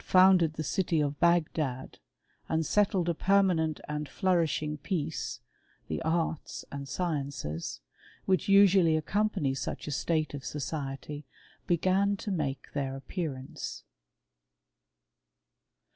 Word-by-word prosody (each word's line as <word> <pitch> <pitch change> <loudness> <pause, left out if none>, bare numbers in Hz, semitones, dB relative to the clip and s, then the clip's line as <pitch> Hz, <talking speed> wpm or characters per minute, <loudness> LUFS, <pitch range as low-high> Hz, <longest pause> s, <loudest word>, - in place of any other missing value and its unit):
founded 185 -4 +5
the 155 - -3
city 165 +1 0
of 145 -1 -1
Bagdad, 155 -6 +1 0.5
and 160 0 +1
settled 195 -1 +2
a 170 - +2
permanent 180 -4 +2
and 150 -1 -3
flourishing 160 -4 0
peace, 155 0 -3 0.5
the 80 - -2
arts 160 -1 -1
and 140 0 -6
sciences, 135 - -3 0.4
"which 190 +1 +1
usually 195 -5 +6
accompany 190 -3 0
such 135 - -4
a 150 - -4
state 155 +1 0
of 140 -2 -6
society, 145 0 -5 0.4
began 190 +4 +2
to 205 - -4
make 145 -7 -3
their 135 -2 -2
appearance. 135 -2 -5
160 Hz, 110 wpm, -30 LUFS, 140-185 Hz, 0.5 s, usually